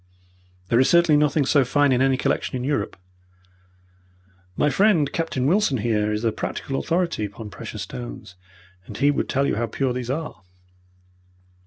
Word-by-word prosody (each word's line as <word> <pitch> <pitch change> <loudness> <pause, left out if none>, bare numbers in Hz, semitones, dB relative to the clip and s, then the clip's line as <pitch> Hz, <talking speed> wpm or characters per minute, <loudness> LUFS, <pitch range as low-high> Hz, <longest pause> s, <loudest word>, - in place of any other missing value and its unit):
There 115 - +3
is 130 - +4
certainly 170 -3 +5
nothing 150 -1 +2
so 140 +1 +4
fine 145 +2 +2
in 125 0 +2
any 135 -1 +3
collection 135 - -1
in 125 - -3
Europe. 145 -5 -2 1.6
My - - +2
friend, 185 -8 +3
Captain 165 -6 -2
Wilson, 175 -3 +2
here, 105 -1 0
is 105 +1 -2
a 115 - +2
practical 135 +4 -4
authority 170 -9 -1
upon 105 +1 -9
precious - - -7
stones, - - -8 0.5
and 105 - -8
he 145 +3 +3
would - - -2
tell 140 +1 +1
you - - 0
how 115 +1 -1
pure 130 +3 -1
these 125 -1 -5
are." 150 -6 -4
135 Hz, 165 wpm, -23 LUFS, 115-150 Hz, 1.6 s, certainly